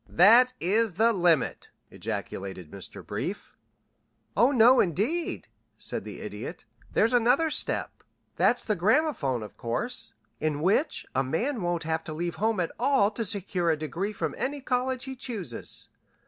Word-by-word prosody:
"That 235 +8 +6
is 210 +3 +2
the 225 +6 +3
limit!" 170 - +1 0.2
ejaculated 95 -4 -5
Mr. - - -9
Brief. - - -5 0.8
"Oh, 240 +5 +5
no 245 0 +6
indeed," 210 - 0 0.3
said - - -5
the - - -8
Idiot. - - -7 0.3
"There's 230 - +2
another 250 +7 +3
step. - - 0 0.3
That's 245 - +2
the 215 - 0
gramophone 180 - +1
course, 230 - -2 0.2
in 150 -1 -1
which 200 - +1
a 135 - +2
man 225 - -1
won't 175 -1 -1
have 160 +1 -1
to 155 - -5
leave 170 +2 -3
home 220 -1 +1
at 175 - -1
all 250 -5 +3
to 230 +2 -3
secure 190 -4 -1
a 160 - +2
degree 170 +7 -3
from 210 - -3
any 285 +2 -2
college 255 -1 -1
he 265 -1 -6
chooses. 215 - -5
205 Hz, 145 wpm, -27 LUFS, 165-250 Hz, 0.8 s, That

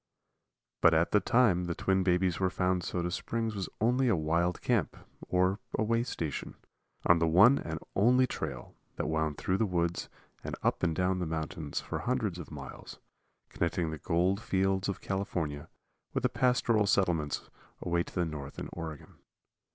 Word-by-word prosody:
But 85 - +6
at 80 +1 +2
the 105 - +5
time 105 -7 +3
the 85 -1 -2
twin 95 0 +1
babies 90 -2 +2
were 95 -1 +2
found 90 -1 0
Soda 90 0 -2
Springs 115 +4 -2
was 100 -3 -4
only 125 +4 +2
a 115 - +4
wild 85 +2 0
camp, - - 0 0.3
or 90 +2 +2 0.2
way 115 +1 +2
station, 85 - -4 0.5
on 85 -1 +5
the 85 - +2
one 100 +12 +6
and 80 -1 -4 0.2
only 125 +6 +5
trail - - -5 0.2
that - - -2
wound 80 -1 -1
through 95 - 0
the 110 - +2
woods 85 -2 -1 0.3
and - - -4
up - - +1
and 85 -3 +1
down 90 +1 +1
mountains 80 -1 -3
for - - -4
hundreds 105 -8 -1
of 85 - -8
miles, 70 -4 -9 0.5
connecting 85 -1 -1
the 80 - -6
gold 90 +7 +1
fields 95 -2 0
of 100 - -4
California 80 -6 -3 0.5
with - - 0
the - - +3
pastoral 120 -4 +2
settlements 85 -7 0 0.3
away 85 0 0
to - - -7
the 90 - +1
north 75 -3 -7
in - - -5
Oregon. 80 -3 -8
90 Hz, 165 wpm, -30 LUFS, 80-100 Hz, 0.5 s, But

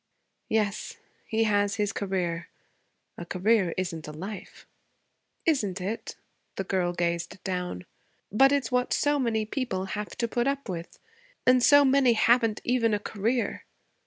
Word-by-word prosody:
'Yes. 215 - -1 0.3
He 225 0 +1
has 205 -2 +2
his 205 -2 -1
career. 180 -4 -2 0.7
A - - -5
career 190 -1 +2
isn't 170 -4 -3
a - - -6
life.' 185 +6 -8 0.8
'Isn't 210 - +1
it?' 200 +5 -4 0.4
The 195 - -2
girl 185 -2 0
gazed 170 0 -2
down. 180 - -3 0.5
'But 270 +7 +5
it's 275 -4 0
what 250 0 +1
so 290 0 +2
many 225 -4 0
people 215 -6 -2
have 210 0 -5
to 235 - 0
put 240 +2 0
up 280 -1 -1
with. 170 -3 -6 0.5
And 255 0 +5
so 285 +3 +7
many 265 -2 +4
haven't 225 -1 +3
even 230 -3 +2
a - - -2
career.' 220 +4 -2
210 Hz, 145 wpm, -27 LUFS, 185-245 Hz, 0.8 s, so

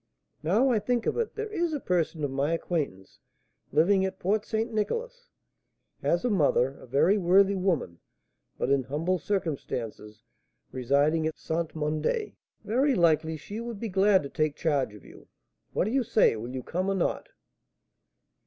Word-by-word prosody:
Now 215 - +3
I 225 - +3
think 235 +2 -1
of - - 0
it, 460 - -2
there 440 0 -4
is 345 -4 0
a 295 - -1
person 170 - -1
of 145 - -1
my 140 +4 0
acquaintance, 145 - -3 0.5
living 190 +6 +4
at 190 - -2
Port 210 +3 0
St. 225 +1 -1
Nicolas, 480 - -3 0.7
has 175 +7 +1
a - - +2
mother, 140 -7 +2
a - - -13
very 155 - +3
worthy 195 +2 +4
woman, 175 - -1 0.6
but 135 - -1
in 140 -1 +4
humble 165 +7 -1
circumstances, 125 - -4 0.5
residing 145 +5 +2
at 160 - -5
St. 160 0 -3
Mandé: 155 - -1 0.3
very 265 +5 +2
likely 160 -2 +2
she 205 +8 -7
would 235 -3 -6
be 230 - -4
glad 195 -1 +4
to 140 - -6
take 155 0 0
charge 140 -9 0
of 105 - -15
you. - - -15 0.4
What - - +1
do 210 - -1
you 270 +1 +2
say, 225 - +3
will 115 +2 -6
you 130 0 -5
come 185 +7 -2
or 195 - +1
not?" 190 - -1
175 Hz, 170 wpm, -28 LUFS, 145-215 Hz, 0.7 s, living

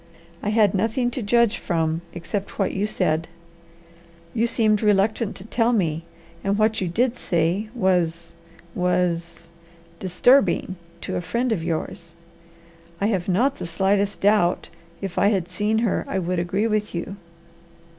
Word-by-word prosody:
I 210 - -1
had 210 -2 +4
nothing 225 +5 0
to 255 - -4
judge 235 +1 +2
from 165 -2 -1
except 190 +4 -5
what 195 - +1
you 200 +2 0
said: 165 -5 0 1.1
you 230 0 +2
seemed 215 -3 +2
reluctant 210 +1 +2
to 185 - -8
tell 230 +1 +1
me, 165 -6 0 0.4
and 200 +1 +1
what 220 0 +2
you 185 - 0
did 235 +8 0
say 175 +5 0
was 170 -5 0 0.4
was 175 -2 -1 0.5
disturbing 190 +2 +3 0.3
to - - -3
a - - -2
friend 235 +8 -1
of 185 -7 0
yours. 170 0 -4 0.8
I 205 - +1
have 190 -4 -1
not 255 +10 +2
the - - -4
slightest 195 +4 0
doubt 200 -3 +2 0.3
if 195 -3 -3
I - - +4
had 190 -4 +1
seen 210 +4 0
her 210 - 0
I - - -2
would 180 -1 -1
agree 185 +5 0
with 215 -3 -1
you. 185 +4 -4
195 Hz, 150 wpm, -23 LUFS, 175-220 Hz, 1.1 s, had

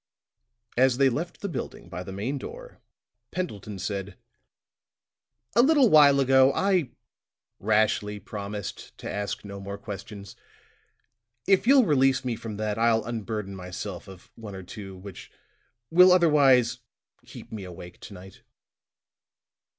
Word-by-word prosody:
As 130 -1 +4
they 135 0 +4
left 160 +8 -4
the 200 - -2
building 180 - -6
by 90 - -6
the 90 - -8
main 115 +9 -3
door, - - -10 0.5
Pendleton 105 - -5
said: 100 -1 -5 1.4
"A 235 - +7
little 275 -3 +4
while 145 -2 +7
ago, 130 0 +5
I 185 -8 +1 0.7
rashly 105 0 +1
promised 100 0 -7
to - - -8
ask 100 +1 -4
no 100 -1 -8
more 100 +1 -6
questions. 100 -1 -9 1.1
If 195 +3 +3
you'll 270 -2 +6
release 135 -5 +2
me 120 -2 -1
from 110 -2 -7
that, 105 0 -2
I'll 115 -1 +2
unburden 110 -3 -4
myself 90 -1 -7
of 95 -2 -14
one 105 -4 -9
or 95 - -8
two 95 0 -9
which 95 0 -11 0.6
will 180 +2 +7
otherwise 145 -9 +4 0.4
keep - - -12
me 110 -3 -6
awake 90 -1 -10
to 100 - -11
night." 95 +1 -13
110 Hz, 135 wpm, -26 LUFS, 100-140 Hz, 1.4 s, A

